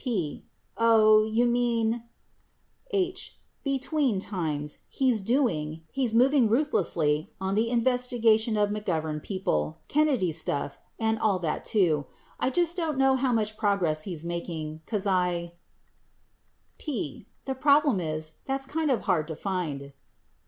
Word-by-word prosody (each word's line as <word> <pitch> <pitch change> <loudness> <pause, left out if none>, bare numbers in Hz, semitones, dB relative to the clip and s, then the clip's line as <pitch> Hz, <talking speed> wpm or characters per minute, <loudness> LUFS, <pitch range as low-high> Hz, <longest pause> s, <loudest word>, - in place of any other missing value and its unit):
P. 195 - -2 0.3
Oh. 215 -2 +5
You 225 +2 +2
mean 235 -1 +1 0.8
H. 375 -3 -1 0.3
Between 275 -4 0
times, 155 -7 -3
he's 255 -5 +1
doing, 165 - 0
he's 260 -4 0
moving 250 +1 +4
ruthlessly 170 - +1
on 190 0 -2
the 220 +3 +1
investigation 235 -2 +2
of 205 -1 +2
McGovern 160 -7 -2
people, 75 - -2
Kennedy 275 - +2
stuff, 145 -3 -2 0.2
and 220 -1 +1
all 210 -4 +2
that 165 -4 -2
too. 165 -9 +1 0.3
I - - +1
just 345 +4 +1
don't 325 -5 -2
know 270 0 +4
how 260 -1 +1
much 215 -2 0
progress 185 -7 +1
he's 170 -2 -5
making, 160 -2 -4
'cause 210 -4 -1
I 180 -3 0 1.3
P. 230 - -4 0.2
The 270 - -1
problem 280 -3 +3
is 155 -1 -4
that's 270 0 -2
kind 315 +2 -1
of 255 - +1
hard 155 -3 +1
to 160 - -5
find. 150 -7 -4
215 Hz, 130 wpm, -27 LUFS, 170-255 Hz, 1.3 s, Oh